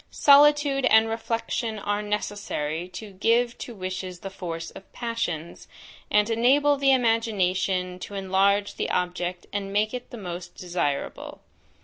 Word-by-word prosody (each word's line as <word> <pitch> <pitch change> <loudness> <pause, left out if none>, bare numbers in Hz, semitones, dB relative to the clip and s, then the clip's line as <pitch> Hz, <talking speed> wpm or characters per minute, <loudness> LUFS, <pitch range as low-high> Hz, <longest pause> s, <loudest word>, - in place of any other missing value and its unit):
Solitude 285 -1 +5
and 220 -2 +5
reflection 225 0 -2
are 205 0 -1
necessary 200 -6 -3
to 205 +3 -9
give 230 +5 +1
to 240 - -7
wishes 185 -1 -5
the 195 - -6
force 165 -3 -6
of 195 - -14
passions, 230 -9 -4 0.4
and 210 0 +3
enable 265 +6 +3
the 275 -1 +3
imagination 190 -7 +1
to 200 - -8
enlarge 195 +1 +1
the - - -2
object 180 0 -2
and 200 -1 -3
make 210 +2 +1
it 250 -1 -6
the 240 - -8
most 175 -3 -7
desirable. 175 -6 -3
205 Hz, 135 wpm, -25 LUFS, 180-230 Hz, 0.4 s, Solitude